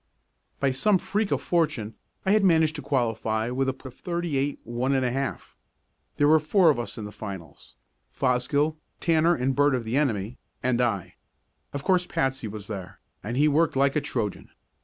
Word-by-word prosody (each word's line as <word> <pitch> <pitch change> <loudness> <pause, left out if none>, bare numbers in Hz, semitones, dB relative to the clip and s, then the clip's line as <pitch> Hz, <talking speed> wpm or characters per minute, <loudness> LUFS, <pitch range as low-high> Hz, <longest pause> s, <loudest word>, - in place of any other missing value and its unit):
By 140 -1 +2
some 190 +10 +3
freak 205 +3 -1
of - - -1
fortune 150 -11 0 0.3
I 190 - +3
had 210 0 +4
managed 160 -4 +4
to - - -5
qualify 115 -4 0
with 135 +1 0
a - - -1
put 130 -1 -11
of - - -28
thirty 170 -3 -2
eight, 140 +1 0
one 120 +3 -1
and 130 -1 +2
a 125 - +1
half. 135 +1 -4 0.6
There 145 - +4
were 155 +1 +6
four 165 +2 +4
of 135 - -2
us 120 - -5
in 110 - -5
the 105 - -7
finals, 95 -6 -9 0.4
Fosgill, 140 +5 +1 0.2
Tanner 165 +1 +3
and 130 +1 0
Burt 145 -1 +4
of 125 - -2
the 115 +4 -1
enemy, 115 -6 -1 0.2
and 125 -1 +2
I. 100 -7 -1 0.5
Of 140 -1 -5
course 180 0 +2
Patsy 135 -3 -1
was 105 -1 -7
there, 95 -2 -7 0.2
and 115 +4 -3
he 150 +2 +5
worked 155 +1 +2
like 140 +1 +3
a 150 - +2
Trojan. 120 -9 -3
135 Hz, 195 wpm, -26 LUFS, 120-155 Hz, 0.6 s, were